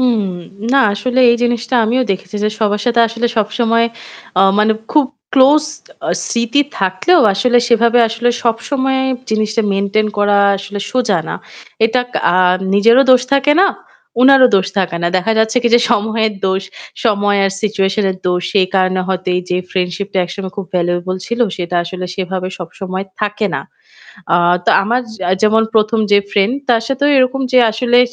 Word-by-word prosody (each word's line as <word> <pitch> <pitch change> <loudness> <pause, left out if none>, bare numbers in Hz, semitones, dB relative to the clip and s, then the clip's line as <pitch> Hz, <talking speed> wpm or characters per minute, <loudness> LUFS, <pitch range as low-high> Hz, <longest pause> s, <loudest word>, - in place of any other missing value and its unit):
হুম। 245 -4 +2 0.5
না 275 - +4
আসলে 250 +5 -1
এই 235 - +2
জিনিসটা 240 +1 -1
আমিও 245 +4 +1
দেখেছি 190 +1 -4
যে - - +2
সবার 210 -1 0
সাথে 235 -1 +2
আসলে 230 +1 -2
সবসময় 230 +2 +1 0.5
আ - - +5 0.2
মানে 215 +1 +3 0.2
খুব 300 -2 +4 0.3
ক্লোজ 285 +3 +4 0.4
আ - - -3 0.2
স্মৃতি 235 +4 0 0.2
থাকলেও 195 - +2
আসলে 245 +5 +2
সেভাবে 235 0 +3
আসলে 230 +2 -1 0.2
সবসময় 265 +3 -1 0.3
জিনিসটা 215 +1 0
মেইনটেইন 200 +2 0
করা 205 0 +2 0.2
আসলে 200 +1 -7
সোজা 235 -7 0
না। - - -4 0.5
এটা 235 +3 +1 0.3
আ - - +1 0.4
নিজেরও 230 +6 +5
দোষ 255 -1 +5
থাকে 275 +1 +3
না, 390 - +5 0.6
উনারও 265 -1 +6
দোষ 190 -1 0
থাকে 180 -3 -1
না। - - +1
দেখা 185 +5 0
যাচ্ছে 220 +2 +1
কি 240 - +2
যে 240 - +5
সময়ের 220 0 0
দোষ, 190 +1 -1 0.4
সময় 205 -2 +1
আর 195 - +1
সিচুয়েশন 200 -1 0
এর 185 - -5
দোষ। 180 0 0
সেই 195 -3 +2
কারণে 185 -1 +1
হয়তো 185 -1 -3
এই - - 0
যে 180 - +1
ফ্রেন্ডশিপ 180 +1 -2
টা - - -1
একসময় 190 +1 -7
খুব 200 -2 -5
ভ্যালুয়েবল 175 +1 -1
ছিল 235 +1 -4 0.2
সেটা 175 -1 -3
আসলে 185 +1 -6
সেভাবে 185 -1 -3
সবসময় 185 +2 -6 0.2
থাকে 210 0 -1
না। - - -2 0.7
আ - - +5 0.3
তো - - +2
আমার 235 +5 0 0.4
যেমন 220 +1 +3
১ম 220 +1 +2
যে 205 - +6
ফ্রেন্ড 205 +4 +1
তার 230 -2 +2
সাথেও 275 +1 0
এরকম 260 +1 +1
যে 255 - +5
আসলে 245 +2 +1
215 Hz, 170 wpm, -15 LUFS, 195-240 Hz, 0.7 s, উনারও